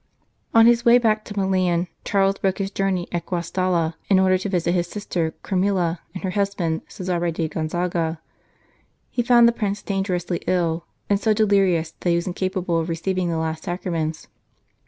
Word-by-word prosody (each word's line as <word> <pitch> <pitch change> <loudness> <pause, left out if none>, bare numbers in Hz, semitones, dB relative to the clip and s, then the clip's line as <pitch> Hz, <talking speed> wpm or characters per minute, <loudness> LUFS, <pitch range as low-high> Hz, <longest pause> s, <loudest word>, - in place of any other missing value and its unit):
On 225 0 +6
his 235 0 +5
way 235 +1 +7
back 215 -3 +2
to 205 - -8
Milan, 185 -3 +1 0.2
Charles 195 -1 +1
broke 190 -1 0
his 195 -1 -3
journey 195 -3 -1
at 170 -1 -3
Guastalla, 175 -1 0 0.2
in 195 - +5
order 190 0 +4
to 190 +2 -2
visit 175 -2 0
his 175 -1 0
sister 175 -5 -3
Camilla 185 -3 0 0.2
and 185 - -6
her 190 - -1
husband, 195 -5 -1
Cesare 175 -2 -2
di 165 0 -2
Gonzaga. 165 0 -2 0.9
He 245 - 0
found 240 -1 +6
the - - +5
Prince 205 -3 -3
dangerously 185 -3 -2
ill, 170 -2 0 0.2
and 200 -1 +2
so 215 0 +2
delirious 195 -6 +2
that 175 - -1
he 170 - +3
was 170 - -1
incapable 185 -2 -1
of 165 +1 -3
receiving 180 +2 -1
the 165 - -1
last 160 0 -3
Sacraments. 165 -3 -3
185 Hz, 175 wpm, -22 LUFS, 170-195 Hz, 0.9 s, way